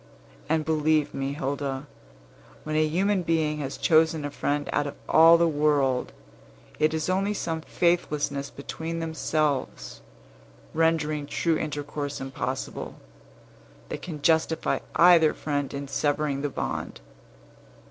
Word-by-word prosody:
And 155 -1 +1
believe 155 -1 +1
me, 135 +1 -2
Hilda, 140 0 -3 0.8
when 155 0 -3
a 155 0 +3
human 190 +5 +1
being 160 -3 0
has 140 -1 -4
chosen 160 -2 +3
a 145 - -4
friend 145 0 -1
out 145 - +1
of 140 - -6
all 165 +1 +7
the 170 0 +3
world, 145 -4 +1 0.7
it 155 0 +3
is 155 -1 -2
only 195 +3 0
some 165 -4 -3
faithlessness 150 -5 0
between 160 +4 -6
themselves, 155 - -2 0.7
rendering 155 -2 +1
true 160 +3 0
intercourse 145 -1 -4
impossible, 135 0 -4 0.9
that - - -5
can 155 -5 -7
justify 160 0 +2 0.2
either 170 -3 +6
friend 145 -2 -2
in 140 0 -5
severing 145 0 0
the 145 - -1
bond. - - -4
150 Hz, 125 wpm, -26 LUFS, 145-160 Hz, 0.9 s, all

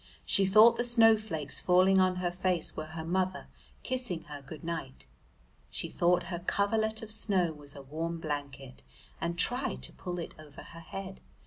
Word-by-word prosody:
She 195 -2 +3
thought 220 +4 +7
the 240 - +1
snowflakes 220 - +3
falling 185 +1 +4
on 185 0 +3
her 180 -1 -1
face 180 -2 -1
were 155 - -5
her 160 - -4
mother 185 +2 -1 0.4
kissing 245 - -3
her 150 -3 -9
good 145 +2 -10
night. 165 - -5 0.6
She - - -4
thought 175 +1 +2
her 170 - -2
coverlet 220 +4 0
of 220 - -7
snow 190 -6 +1
was 145 -2 -10
a 140 - -9
warm 165 +4 -4
blanket, 140 -4 -5 0.4
and 170 0 -2
tried 250 +6 +1
to - - -3
pull 180 -1 -5
it 170 - -5
over 150 -2 -12
her 165 - -12
head. 190 +3 -8
180 Hz, 175 wpm, -30 LUFS, 160-200 Hz, 0.6 s, thought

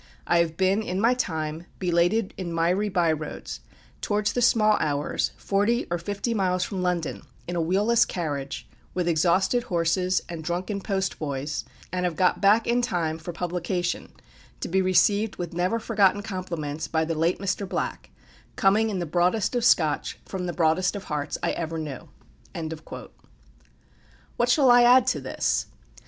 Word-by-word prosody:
I 170 - +3
have 165 -1 0
been, 190 +3 +2
in 185 -3 -3
my 230 +4 +4
time, 160 -7 -3
belated 180 +4 +1
in 180 -3 -5
miry 180 +5 +1
by 175 -4 +2
roads, 155 -1 -5 0.4
towards 210 0 0
the 245 - 0
small 215 -3 +4
hours, 145 -1 -1
forty 210 +5 +1
or 175 - 0
fifty 205 +6 -3
miles 185 -4 +1
from 190 -1 -3
London, 180 -3 -1 0.3
in 175 - -3
a 170 - +1
wheel 185 +5 +1
less 235 0 +5
carriage, 145 -6 -4 0.3
with 180 -2 0
exhausted 175 +8 +2
horses, 180 0 +1
and 170 -2 -6
drunken 185 +5 -3
postboys, 155 -8 -3 0.3
and 180 0 -1
have 175 -2 -1
got 185 +1 +2
back 210 +3 +5
in 240 +1 +2
time 165 -7 -1
for 170 +2 -6
publication, 175 +1 -3 0.5
to - - -4
be 190 +2 +2
received 200 +3 +3
with 175 -2 -5
never 180 +6 0
forgotten 205 -3 +2
compliments 170 -7 -4
by 160 0 0
the 165 - -2
late 165 +3 +1
Mr. 195 0 -2
Black, - - -3 0.5
coming 210 +3 +3
in 200 - -2
the 175 - -2
broadest 180 +7 +1
of 240 - 0
Scotch 155 -10 +2
from 185 -2 -4
the 175 - -3
broadest 170 +4 +2
of 200 - -5
hearts 150 -2 -3
I - - +1
ever 165 -1 -3
knew." 150 -5 -6 2.3
What 240 +1 +1
shall 265 -1 +5
I 245 0 +7
add 245 +1 +6
to 255 - 0
this? - - -1
180 Hz, 165 wpm, -25 LUFS, 165-205 Hz, 2.3 s, I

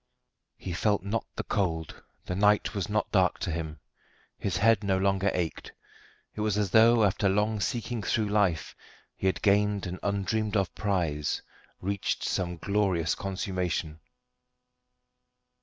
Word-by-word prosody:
He 90 - -5
felt 100 +2 +1
not 105 +3 -2
the - - -3
cold, 80 -6 -2 0.2
the - - -3
night 105 +2 +3
was 100 -3 -3
not 105 0 0
dark 95 -4 +3
to 95 - -1
him. 80 -2 -4 0.6
His 95 - -1
head 110 -1 +4
no 95 -1 +1
longer 95 +1 +2
ached. 85 -3 -3 0.6
It 105 - -5
was 105 -1 +1
as 105 -4 0
though 115 +1 +6
after 100 0 +2
long 105 +2 +1
seeking 120 +1 -2
through 105 +1 0
life 100 -6 +1 0.4
he 95 - -1
had 95 - -1
gained 105 0 +3
an 90 0 -5
undreamed 105 +1 0
of 95 -2 0
prize, 85 -8 -1 0.4
reached 100 +1 -2
some 90 -2 -1
glorious 95 -3 +1
consummation. 90 -5 -3
100 Hz, 140 wpm, -28 LUFS, 90-105 Hz, 0.6 s, though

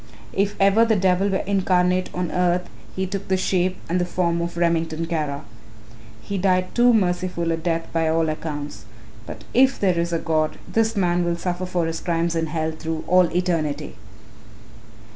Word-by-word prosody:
If 200 +1 0
ever 200 +3 +5
the 225 -1 +3
devil 190 0 +2
were 190 - -1
incarnate 185 -2 +1
on 180 -2 -3
earth 180 0 +1 0.3
he 190 - -1
took 195 +1 -5
the 190 - +2
shape 185 0 0
and 180 +2 0
the - - +2
form 170 -1 0
of 170 0 -4
Remington 165 -1 0
Kara. 155 -3 -2 0.8
He 200 -1 -3
died 185 -1 +1
too 245 0 +5
merciful 180 -5 0
a - - +2
death 165 0 -1
by 165 -1 +1
all 165 0 +2
accounts. 150 -2 -5 0.4
But - - -8
if 265 +1 +4
there 185 -4 +2
is 170 0 -1
a 170 - +1
God, 155 -1 0
this 225 0 +1
man 175 -2 +1
will 170 0 0
suffer 180 +1 -3
for 175 -2 0
his 165 0 -3
crimes 170 -1 -1
in 165 0 0
hell 160 0 -2
through 160 0 -5
all 185 0 +5
eternity." 155 -5 -1
175 Hz, 180 wpm, -23 LUFS, 165-185 Hz, 0.8 s, ever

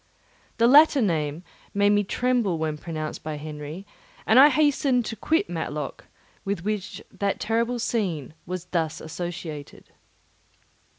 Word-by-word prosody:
The 230 - +4
latter 290 +3 +7
name 160 - 0 0.3
made 205 0 +4
me 205 0 +3
tremble 235 -4 0
when 155 -1 -2
pronounced 155 0 -5
by 155 -1 -4
Henry, 150 +4 -7 0.4
and 225 +4 +6
I 285 +2 +9
hastened 280 -4 +2
to 225 - -4
quit 320 - +1
Matlock, - - -5 0.4
with 195 -3 -3
which 210 -2 -3
that 200 -1 -2
terrible 230 +2 0
scene 185 - -2
was 180 0 -4
thus 165 -4 -2
associated. 160 -2 -7
195 Hz, 130 wpm, -25 LUFS, 160-235 Hz, 0.4 s, I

